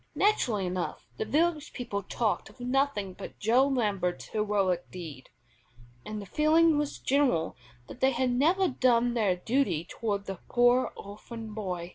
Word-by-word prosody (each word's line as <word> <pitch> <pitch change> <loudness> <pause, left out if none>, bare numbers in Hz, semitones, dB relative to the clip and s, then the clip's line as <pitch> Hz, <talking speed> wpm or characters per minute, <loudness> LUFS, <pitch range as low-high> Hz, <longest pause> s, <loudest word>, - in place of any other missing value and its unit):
Naturally 245 - +2
enough 180 0 -3
the 440 - -2
village 315 -2 0
people 230 -5 -3
talked 215 +3 -1
of - - -19
nothing 250 -6 0
but - - -9
Joe 245 +6 +3
Lambert's 205 -9 -1
heroic 200 -4 0
deed, 155 -8 -9 0.7
and 215 0 -5
the 200 - -7
feeling 315 - +4
was 295 -1 -1
general 265 - +1 0.3
that - - -10
they 265 - +4
had 255 0 0
never 335 +10 +3
done 245 -4 +2
their 210 -6 +2
duty 220 - 0
toward 205 -3 -3
the 195 -2 -6
poor 245 +1 +4
orphan 215 +2 -9
boy. 180 -5 -4
230 Hz, 150 wpm, -29 LUFS, 195-270 Hz, 0.7 s, feeling